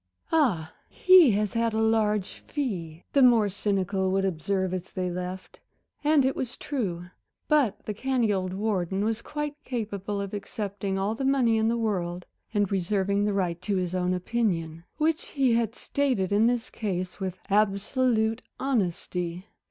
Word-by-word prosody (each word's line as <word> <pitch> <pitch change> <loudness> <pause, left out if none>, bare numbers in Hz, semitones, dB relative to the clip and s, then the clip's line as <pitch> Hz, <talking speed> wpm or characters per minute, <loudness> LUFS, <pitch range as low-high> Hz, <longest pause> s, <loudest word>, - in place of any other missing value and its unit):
"Ah, 220 - +2 0.2
he 370 -6 +7
has 210 0 0
had 230 -1 +1
a - - -1
large 215 -3 +1
fee," 180 - -4
the 280 - +5
more 235 -5 +6
cynical 195 -1 0
would 195 0 +1
observe 190 +2 -1
as 185 0 -4
they 180 -1 -3
left, 180 +1 -6 0.4
and 295 -2 +4
it 265 - +1
was 255 -2 -4
true. 190 - -3 0.4
But 290 -9 +2
the 210 - -3
canny 240 -1 +1
old 185 -1 -1
warden 195 -1 -1
was 225 +1 -1
quite 295 0 -5
capable 205 -4 -3
of 200 0 -4
accepting 200 -1 -3
all 195 +3 0
the 245 - -4
money 265 -4 +3
in 220 - +2
the 235 +1 +1
world, 180 -6 -2 0.3
and 205 -3 +1
reserving 200 +1 +1
the 210 - +1
right 180 -3 -1
to 200 +2 -1
his 180 -1 -1
own 180 0 +1
opinion, 175 -5 -1
which 315 +2 0
he 265 -4 +2
had 230 -1 +1
stated 255 -10 0
in 210 +3 +4
this 245 0 -1
case 185 -4 -3
with 185 -2 -3
absolute 220 +3 +2 0.2
honesty. 180 -7 -2
205 Hz, 160 wpm, -27 LUFS, 185-235 Hz, 0.4 s, he